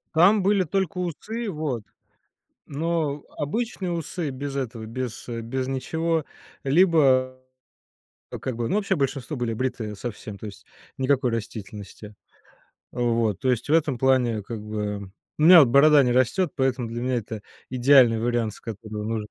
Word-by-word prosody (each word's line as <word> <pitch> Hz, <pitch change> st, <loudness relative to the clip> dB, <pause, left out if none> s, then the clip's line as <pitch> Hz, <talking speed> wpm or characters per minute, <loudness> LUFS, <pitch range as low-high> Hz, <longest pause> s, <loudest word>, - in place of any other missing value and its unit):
Там 190 Hz, +5 st, +5 dB
были 200 Hz, 0 st, +3 dB
только 190 Hz, +3 st, -2 dB
усы, 210 Hz, +7 st, -4 dB
вот, 150 Hz, -, -3 dB, 0.8 s
но 150 Hz, -1 st, -2 dB
обычные 190 Hz, +3 st, -2 dB
усы 170 Hz, -1 st, -3 dB
без 140 Hz, +1 st, -5 dB
этого, 120 Hz, -4 st, -4 dB
без, 120 Hz, +1 st, -5 dB
э, 115 Hz, -1 st, -4 dB
без 130 Hz, +3 st, -3 dB
ничего, 160 Hz, +5 st, -1 dB, 0.4 s
либо 135 Hz, -5 st, +3 dB, 0.9 s
то, -, -, -7 dB
как 130 Hz, -, -4 dB
бы, 115 Hz, 0 st, -2 dB
ну, -, -, 0 dB
вообще 200 Hz, -2 st, 0 dB
большинство 140 Hz, 0 st, -2 dB
были 120 Hz, -3 st, -2 dB
бритые 115 Hz, -3 st, -3 dB
совсем, 105 Hz, -2 st, -7 dB
то 110 Hz, -, -9 dB
есть 100 Hz, -2 st, -10 dB, 0.3 s
никакой 130 Hz, -2 st, +1 dB
растительности. 105 Hz, -1 st, -7 dB, 0.8 s
Вот. 115 Hz, -5 st, 0 dB
То 130 Hz, -, +1 dB
есть 125 Hz, +1 st, -1 dB
в -, -, +1 dB
этом 150 Hz, -5 st, +2 dB
плане, 125 Hz, -4 st, +2 dB
как 110 Hz, 0 st, -6 dB
бы 105 Hz, -2 st, -4 dB, 0.3 s
У -, -, -2 dB
меня 175 Hz, +3 st, +9 dB
вот 140 Hz, -, +6 dB
борода 140 Hz, +3 st, +6 dB
не 125 Hz, -, +2 dB
растёт, 130 Hz, +8 st, +2 dB
поэтому 130 Hz, -2 st, 0 dB
для 120 Hz, +1 st, -5 dB
меня 130 Hz, 0 st, 0 dB
это 110 Hz, -2 st, -5 dB, 0.3 s
идеальный 125 Hz, -3 st, +5 dB
вариант, 120 Hz, -2 st, 0 dB
с -, -, -15 dB
которым 110 Hz, -1 st, -6 dB
нужно 110 Hz, -2 st, -2 dB
130 Hz, 160 wpm, -24 LUFS, 115-155 Hz, 0.9 s, меня